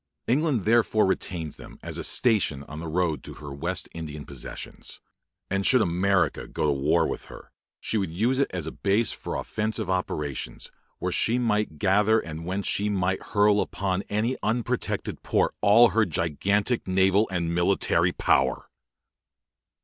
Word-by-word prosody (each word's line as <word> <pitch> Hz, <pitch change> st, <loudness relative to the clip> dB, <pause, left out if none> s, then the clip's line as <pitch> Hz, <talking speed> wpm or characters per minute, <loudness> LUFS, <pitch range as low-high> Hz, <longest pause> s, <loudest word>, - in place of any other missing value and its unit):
England 135 Hz, -, +1 dB
therefore 110 Hz, -1 st, +3 dB
retains 90 Hz, -4 st, -2 dB
them -, -, -12 dB
as -, -, -4 dB
a -, -, -3 dB
station 100 Hz, -, +2 dB
on 75 Hz, +2 st, -9 dB
the 85 Hz, -, -6 dB
road 80 Hz, -1 st, 0 dB
to -, -, -9 dB
her 70 Hz, -2 st, -8 dB
West 85 Hz, +6 st, -2 dB
Indian 75 Hz, -3 st, -7 dB
possessions; -, -, -8 dB, 0.5 s
and 95 Hz, +1 st, -1 dB
should 130 Hz, +5 st, +5 dB
America 95 Hz, -1 st, +1 dB
go -, -, -2 dB
to 75 Hz, -, +3 dB
war 70 Hz, +2 st, +2 dB
with -, -, -4 dB
her, -, -, -13 dB, 0.3 s
she 110 Hz, -, -1 dB
would 95 Hz, -, -2 dB
use 115 Hz, +11 st, 0 dB
it 140 Hz, -, +2 dB
as 90 Hz, -4 st, -4 dB
a -, -, -4 dB
base 100 Hz, +2 st, +1 dB
for -, -, -6 dB
offensive 110 Hz, -2 st, -2 dB
operations, 75 Hz, -9 st, -3 dB, 0.3 s
where -, -, -2 dB
she 115 Hz, +2 st, +2 dB
might 105 Hz, -9 st, 0 dB
gather 105 Hz, +6 st, +3 dB
and 80 Hz, -3 st, -7 dB
whence 95 Hz, +2 st, -2 dB
she 105 Hz, +1 st, +1 dB
might 95 Hz, -2 st, 0 dB
hurl 105 Hz, 0 st, +3 dB
upon 95 Hz, -1 st, -2 dB
any 110 Hz, +5 st, 0 dB
unprotected 120 Hz, +3 st, -2 dB
port -, -, +1 dB
all 110 Hz, +3 st, +6 dB
her 115 Hz, -, +2 dB
gigantic 100 Hz, -, 0 dB
naval 95 Hz, +3 st, +3 dB
and 85 Hz, -2 st, -2 dB
military 90 Hz, -1 st, +2 dB
power. 65 Hz, -5 st, +1 dB
95 Hz, 160 wpm, -26 LUFS, 85-110 Hz, 0.5 s, all